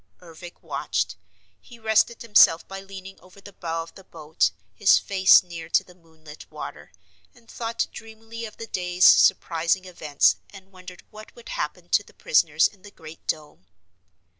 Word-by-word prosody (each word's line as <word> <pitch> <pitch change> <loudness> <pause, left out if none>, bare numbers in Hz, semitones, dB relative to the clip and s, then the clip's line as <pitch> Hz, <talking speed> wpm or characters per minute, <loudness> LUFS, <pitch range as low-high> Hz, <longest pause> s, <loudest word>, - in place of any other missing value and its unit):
Ervic 175 0 -13
watched. - - -3 0.5
He 240 - -15
rested 220 +1 +1
himself 205 -7 +5
by 195 0 -7
leaning 195 0 -11
over 185 +2 -19
the 200 0 -14
bow 165 -2 -4
of 165 - -16
the 195 - -15
boat, 155 - -1 0.2
his 90 - +4
face 190 -2 +5
near 165 -2 -9
to 195 - +3
the 180 - -18
moonlit 160 -3 -16
water, - - -9 0.4
and 235 -2 -23
thought 230 0 -3
dreamily 225 +1 -10
of 215 - -11
the 230 - -7
day's 180 -3 0
surprising 175 0 +4
events 155 -5 +1
and 195 -1 -15
wondered 185 -1 -13
what 215 0 -13
would 485 0 -13
happen - - -5
to - - +3
the - - -20
prisoners - - +2
in 200 -3 -22
the 205 - -13
Great 160 -4 -14
Dome. 150 -11 -5
185 Hz, 165 wpm, -24 LUFS, 165-215 Hz, 0.5 s, himself